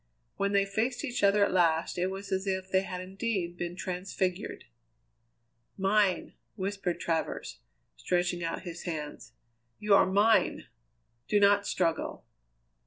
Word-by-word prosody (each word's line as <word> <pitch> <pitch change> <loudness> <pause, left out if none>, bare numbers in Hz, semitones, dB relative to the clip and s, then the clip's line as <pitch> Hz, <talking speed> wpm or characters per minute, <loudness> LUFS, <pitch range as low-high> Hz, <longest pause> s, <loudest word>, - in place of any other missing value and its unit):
When 200 0 0
they 200 0 +4
faced 225 +7 -1
each 250 -3 -3
other 200 0 +5
at - - -2
last 170 -1 +2
it 180 - +1
was 195 +1 -6
as 190 +1 -1
if 190 0 -2
they 190 - +4
had 185 -1 -5
indeed 190 -2 -3
been 175 0 -4
transfigured. 185 +1 -3 1.1
"Mine!" 195 -1 +2 0.2
whispered 195 -3 -2
Travers, 160 - -2 0.4
stretching 175 -1 0
out 165 - -3
his 175 -1 -7
hands. 155 -4 -5 0.4
"You 210 -1 +2
are 200 - +6
mine! 200 0 +3 0.6
Do 210 - +3
not 200 0 +4
struggle." 165 -1 -1
190 Hz, 135 wpm, -30 LUFS, 175-200 Hz, 1.1 s, are